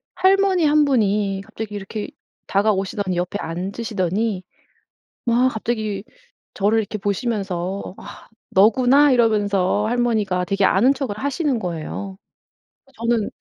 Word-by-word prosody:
할머니 380 -2 +3
1 300 0 +4
분이 205 -6 +1
갑자기 215 0 -7
이렇게 205 +1 -5 0.4
다가오시더니 195 -2 0
옆에 180 +3 -2
앉으시더니 190 +3 -2 0.8
막 245 +2 +3
갑자기 215 -3 -3 0.5
저를 210 +2 +2
이렇게 215 0 -5
보시면서 195 -3 -3
"아 - - -12 0.2
너구나?" 255 +8 +5
이러면서 210 -4 +2
할머니가 220 -6 0
되게 195 +1 0
아는 205 +8 +4
척을 260 -7 -4
하시는 280 0 -1
거예요. 190 +1 -5 0.8
저는 230 -2 +1
210 Hz, 280 characters per minute, -21 LUFS, 195-240 Hz, 0.8 s, 너구나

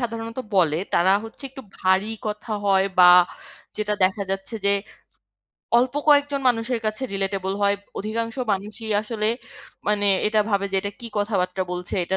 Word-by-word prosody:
সাধারণত 230 0 -4 0.2
বলে 165 -5 +3 0.2
তারা 180 +2 +4
হচ্ছে, 225 +5 -11
একটু 265 0 -10 0.2
ভারী 190 +2 +2 0.2
কথা 210 +2 -5 0.2
হয় 195 -1 +4
বা 180 - +9 0.7
যেটা 210 0 -1
দেখা 190 +2 +2
যাচ্ছে 195 +4 -4
যে, - - +4 1.1
অল্প 250 +2 +2
কয়েকজন 285 -1 +4
মানুষের 235 0 0
কাছে 215 +4 -2
রিলেটেবল 195 -1 -2
হয়। 200 0 +4 0.2
অধিকাংশ 225 +3 -3 0.2
মানুষই 210 +3 -5
আসলে 215 -1 -3 0.6
মানে 205 -1 +1 0.2
এটা 215 0 +1
ভাবে 200 0 +1
যে, - - +2
এটা 200 - -4
কি 235 - -6
কথাবার্তা 190 -3 0
বলছে, 180 0 -4
এটা 190 +2 -1
210 Hz, 155 wpm, -23 LUFS, 195-230 Hz, 1.1 s, বা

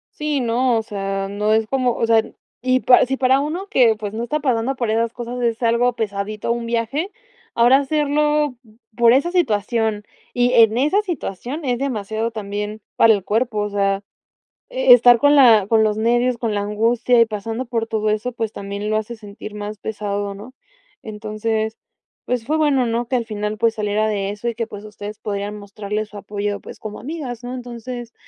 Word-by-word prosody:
Sí, 300 -2 -1
no, 240 +1 +1
o 225 - -1
sea, 195 -2 -3
no 210 +2 0
es 220 0 +2
como, 255 -1 +1
o 230 - 0
sea, 225 -1 +4 0.4
y 255 +1 +2
para 250 - +6
si 270 +2 -1
para 265 0 +3
uno 325 +7 -3
que 245 - +4
pues 210 -1 -6
no 225 +2 -3
está 300 +6 -1
pasando 255 -1 0
por 240 -3 -2
esas 230 +1 0
cosas 245 +1 -5
es 230 -1 0
algo 235 +2 +2
pesadito 210 0 -3
un 235 0 -2
viaje, 235 - -1 0.5
ahora 240 +3 +6
hacerlo 295 -1 +1 0.4
por 235 -1 +6
esa 280 +7 +2
situación 220 - 0 0.3
y 245 0 +2
en 225 -2 +5
esa 305 +11 +3
situación 295 - -5
es 245 -3 -1
demasiado 225 -4 -2
también 210 0 -5 0.2
para 225 -1 +6
el 200 -3 -2
cuerpo, 225 +2 0
o 210 0 -1
sea, 195 -1 0 0.7
eh, - - +6
estar 245 - +7
con 285 +4 +4
la 230 -7 +7
con 220 0 +4
los 215 -1 +1
nervios, 240 +2 +2
con 230 -2 -2
la 205 - 0
angustia 230 +4 +2
y 230 - +7
pasando 225 +3 -4
por 230 -2 -2
todo 215 -1 -1
eso 215 +4 -2
pues 225 -3 -3
también 200 +1 -5
lo 215 - +1
hace 220 +2 -4
sentir 210 -1 -10
más 210 0 -6
pesado, 205 -1 -3
¿no? 220 +6 -11 0.5
Entonces, 220 +1 -3 0.5
pues 245 -2 -1
fue 305 +5 0
bueno, 280 -5 +2
¿no? 230 +1 -1
Que 255 - -1
al 235 - -2
final 210 -1 -3
pues 230 -1 +2
saliera 215 0 0
de 200 -2 -1
eso 210 +3 -6
y 235 - -1
que 230 0 -2
pues 205 -2 -10
ustedes 210 0 -8
podían 205 0 -4
mostrarles 210 +1 -5
su 210 - -10
apoyo 205 0 -3
pues - - -11
como 215 -1 -7
amigas, 260 -6 -6
¿no? 245 +1 -5
Entonces, 240 -1 -7
230 Hz, 195 wpm, -20 LUFS, 210-250 Hz, 0.7 s, estar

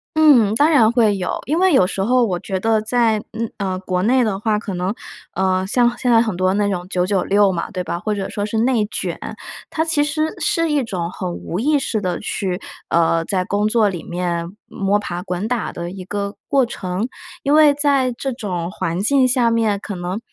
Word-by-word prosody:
嗯， 275 -10 +5
当 290 +6 +4
然 235 -9 +5
会 225 -4 +3
有。 180 -1 -2
因 310 +5 0
为 375 0 +4
有 190 - +5
时 190 +1 -3
候 245 +4 +3
我 180 -5 -2
觉 190 +1 -3
得 220 +2 +2
在 225 -1 +2
嗯， 230 0 -3
呃， 190 -2 -2
国 185 -1 -2
内 250 +4 +3
的 205 -4 -1
话， 215 0 +1
可 210 -2 -5
能， 180 +2 -1 0.4
呃， 185 0 +1
像 240 +2 +2
现 245 - 0
在 230 - +6
很 220 -5 -1
多 185 +1 +1
那 205 0 +1
种 180 -3 -3
九 180 -2 0
九 190 -1 +1
六 200 0 +3
嘛， 170 +2 -3
对 185 -3 -3
吧， 170 0 -3
或 215 +4 -2
者 195 -1 -3
说 205 - -3
是 215 +2 -3
内 230 -1 +2
卷， - - -3 0.5
它 320 - 0
其 320 -3 +2
实 310 +1 -1
是 330 -1 +1
一 290 -2 +2
种 180 -7 -3
很 180 -1 -4
无 175 +1 -5
意 295 +6 +2
识 235 -6 -2
地 180 -3 -2
去 190 -3 -3 0.3
呃， 165 0 +2
在 185 -1 -1
工 205 +1 0
作 215 -1 +3
里 180 -4 -4
面 175 -1 -3
摸 200 +1 0
爬 175 -4 -4
滚 180 +2 -3
打 245 -1 -2
的 170 0 -6
一 190 0 -8
个 200 +1 -4
过 270 -2 +3
程。 190 -2 -3 0.4
因 280 - +2
为 305 -1 +6
在 280 -3 +2
这 270 +3 -4
种 185 -8 -4
环 175 -3 -3
境 260 +5 +3
下 245 -2 +2
面， 220 -3 +1
可 205 -1 -6
能， 180 +3 -4
205 Hz, 235 characters per minute, -20 LUFS, 185-245 Hz, 0.5 s, 在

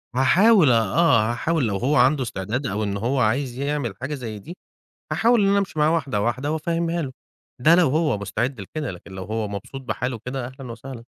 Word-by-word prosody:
هاحاول 170 - +5
أ - - +5
آه، 115 - +3
هاحاول 145 +3 0
لو 100 -2 -1
هو 135 +9 +1
عنده 135 +1 +4
استعداد 110 +4 -3
أو 105 +2 -2
إن 100 -1 -2
هو 125 +6 -1
عايز 125 +2 0
يعمل 140 -5 -2
حاجة 130 +3 -3
زي 115 -6 -6
دي. 170 - -10 0.6
هاحاول 235 0 +3
إن 195 - +3
أنا 200 0 +3
أمشي 195 -5 -3
مع 150 0 +4
واحدة 140 -10 0
واحدة 130 +6 -1
وأفهمها 165 +1 -1
له. 135 -3 -5 0.5
ده 155 +7 +5
لو 175 -3 +4
هو 150 -4 +1
مستعد 115 +5 -3
لكده، 145 +9 -5
لكن 90 +1 -11
لو 95 0 -6
هو 110 +1 -3
مبسوط 100 +7 -7
بحاله 125 -1 -3
كده 125 -1 -3
أهلا 130 -1 -9
وسهلا. 120 0 -9
130 Hz, 205 wpm, -23 LUFS, 115-155 Hz, 0.6 s, هاحاول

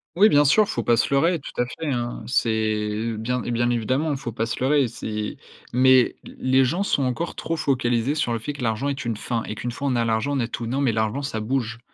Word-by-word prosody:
Oui, 205 +4 +7
bien 145 -8 +5
sûr, 145 +10 +5
il - - -4
faut - - -1
pas 120 -1 +3
se 115 - +1
leurrer, 165 +4 +3
tout - - -9
à 125 - +1
fait, 160 +5 -7
hein. 120 -2 -3
C'est 120 -1 +1
l 110 0 -1
bien 125 +3 -1
bien 120 +1 0
évidemment, 130 +6 0
il 140 - -1
faut 120 -3 -5
pas 115 +1 -2
se 120 - -4
leurrer, 135 0 +3
c'est 105 -2 -5 0.3
mais, 130 0 +5
l - - -11
les 130 0 +3
gens 170 +10 0
sont 170 -8 +1
encore 130 +7 -2
trop 165 - -3
focalisés 130 -3 0
sur 125 -6 0
le 115 - -1
fait 145 +7 -5
que 140 -3 -7
l'argent 115 +4 0
est 135 -3 -4
une 115 -1 -1
fin 115 +2 -3
et - - -5
qu'une 120 +3 -4
fois 140 +4 -4
on 130 - +1
a 120 -1 +1
l'argent, 115 +5 0
on - - 0
a 115 - 0
tout. 115 0 -5
Non, 130 +5 -1
mais 125 -5 +2
l'argent 110 +5 0
ça 135 -6 -3
bouge 120 0 -2
125 Hz, 265 wpm, -23 LUFS, 115-140 Hz, 0.3 s, Oui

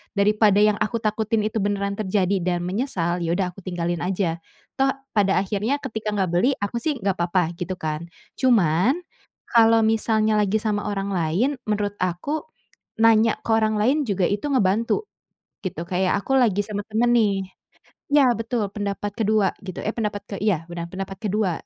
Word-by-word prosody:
daripada 205 0 +4
yang 210 0 +4
aku 225 +2 -1
takutin 215 0 0
itu 220 - -3
beneran 200 0 -1
terjadi 195 -2 +1
dan 175 -1 0
menyesal, 180 -5 -1
ya 165 - 0
udah 185 -1 0
aku 185 +1 -14
tinggalin 175 -2 -2
aja, 180 -3 -1 0.4
toh 270 0 +3 0.3
pada 195 -1 +4
akhirnya 210 +8 -1
ketika 215 -1 -4
nggak 190 -3 0
beli, 180 +11 +2
aku 205 +3 -2
sih 310 - +1
nggak 195 -1 0
apa-apa 175 -1 0
gitu 175 +1 -3
kan. 155 0 -3 0.3
Cuman 235 - +3 0.5
kalau 225 -1 +5
misalnya 220 -1 +2
lagi 210 +1 +2
sama 210 -2 -1
orang 200 -1 -2
lain 175 - +1 0.2
menurut 205 -1 -1
aku, 185 - -2 0.6
nanya 225 0 +5
ke - - -10
orang 215 -1 +1
lain 280 +6 +2
juga 195 -5 0
itu 205 +4 -2
ngebantu, 230 - +1 0.6
gitu. 175 -4 -4
Kayak 185 +2 0
aku 270 - -1
lagi 210 -6 +3
sama 205 -1 -4
teman 225 +3 +1
nih 200 -5 +2 0.7
iya, 290 -1 +6
betul, 225 -2 -1
pendapat 205 0 -3
ke-2 215 -3 +2
gitu 185 -2 -7
eh 215 - -1
pendapat 210 -3 -2
ke - - -6
iya 185 -7 +1
benar, 170 -1 -4
pendapat 195 0 -5
ke-2. 210 -2 0
205 Hz, 170 wpm, -23 LUFS, 185-220 Hz, 0.7 s, iya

